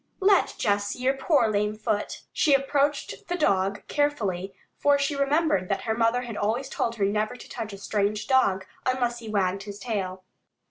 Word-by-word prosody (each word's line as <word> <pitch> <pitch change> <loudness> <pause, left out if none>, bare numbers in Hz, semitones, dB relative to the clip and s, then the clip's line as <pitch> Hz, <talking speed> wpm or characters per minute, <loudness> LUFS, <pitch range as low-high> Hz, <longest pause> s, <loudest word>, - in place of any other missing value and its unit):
"Let 390 -1 +3
Jess 205 0 +1
see 250 - -5
your 265 +1 +3
poor 270 -2 +2
lame 210 0 0
foot." 215 -1 -2
She 290 -4 +4
approached 280 +1 0
the 355 - -1
dog 195 - +1
carefully, 200 -11 -1 0.2
for 285 0 +3
she 280 +1 0
remembered 280 - +1
that 195 - 0
her 220 - 0
mother 235 +2 +2
had 235 -3 -6
always 230 +6 -1
told 230 - -1
her 205 -3 +1
never 210 +3 0
to - - -12
touch 225 -3 -6
a 200 - -8
strange 205 +1 -1
dog 200 -8 +2 0.2
unless 245 -2 0
he 225 -2 -8
wagged 195 -2 0
his 200 0 -8
tail. 190 -5 -3
225 Hz, 185 wpm, -26 LUFS, 200-275 Hz, 0.2 s, She